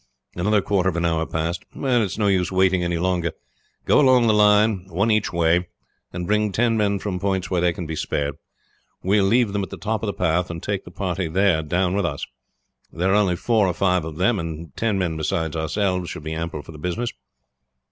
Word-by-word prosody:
Another 105 +3 +1
quarter 95 -2 +1
of 85 - -4
an 85 0 0
hour 80 -1 0
passed. 85 +3 -2
"It 125 -3 +1
is 100 -3 -2
no 105 - +1
use 95 -3 +2
waiting 95 -1 +3
any 85 -1 -1
longer. 85 -1 0 0.5
Go - - +4
along 130 -4 +5
the 110 - +4
line, 105 -2 +4
one 100 +6 +1
each 105 -1 +1
way, 85 +1 +2 0.4
and 90 0 -4
bring 105 +1 +1
ten 115 +3 +2
men 100 -2 +1
from 95 -2 -4
points 95 0 -1
where 90 -2 +1
they 90 0 +3
can 85 +1 -6
be 80 0 -4
spared. 70 -1 -2 0.7
We 100 +3 +3
will 95 - +2
leave 115 -1 +2
them 100 - 0
at 95 - -4
the - - -8
top 110 0 -2
of 110 - -3
the 100 - -1
path 90 0 0
and 85 -1 -6
take 100 -2 -3
the - - -9
party 90 0 -3
there 95 -1 +2
down 90 +4 0
with 100 -3 +1
us. - - -4 0.7
There 90 +3 0
are - - +4
only 100 -4 +3
four 110 +1 +2
or 90 - 0
five 90 -3 +2
of 80 -1 -7
them, 105 +4 +2
and 80 -2 -6
ten 110 -3 0
men 85 -4 -1
beside 80 +1 -2
ourselves 90 +2 -1
are 80 - -8
ample 80 -1 -4
for - - -11
the 75 - -11
business." 90 +9 -2
90 Hz, 225 wpm, -22 LUFS, 85-105 Hz, 0.7 s, along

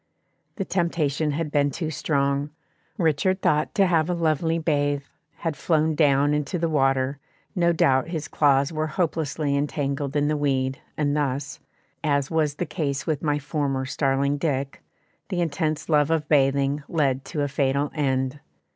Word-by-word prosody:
The 195 - -3
temptation 160 -5 0
had 150 +1 -2
been 145 -1 +2
too 160 +2 -4
strong; 140 -1 0 0.5
Richard 180 +2 +1
thought 150 +8 +1
to 200 -3 +4
have 165 -2 +2
a 180 - +1
lovely 165 0 +1
bathe, 145 -3 0 0.3
had 165 -3 -3
flown 160 0 +1
down 145 -1 +3
into 150 +4 -1
the 165 0 0
water, 135 -2 +1 0.4
no 170 -2 +3
doubt 135 -5 +2
his 160 -4 -4
claws 140 +1 +2
were 155 0 -1
hopelessly 155 -3 -1
entangled 140 -1 -2
in 145 0 +2
the 150 - +1
weed 135 -2 0 0.2
and 145 -1 +1
thus, 140 -1 -2 0.4
as 140 -2 +1
was 155 -3 +1
the 175 - -2
case 140 -4 -3
with 155 -3 -1
my 145 -2 +1
former 145 -2 -2
starling 140 +1 0
Dick, 140 -3 -2 0.5
the 185 -3 -2
intense 155 -2 -1
love 150 -2 +3
of 160 -2 0
bathing 140 0 +2
led 140 -5 +1
to 150 - -2
a - - 0
fatal 140 +1 0
end. 135 -2 -1
145 Hz, 160 wpm, -24 LUFS, 140-160 Hz, 0.5 s, to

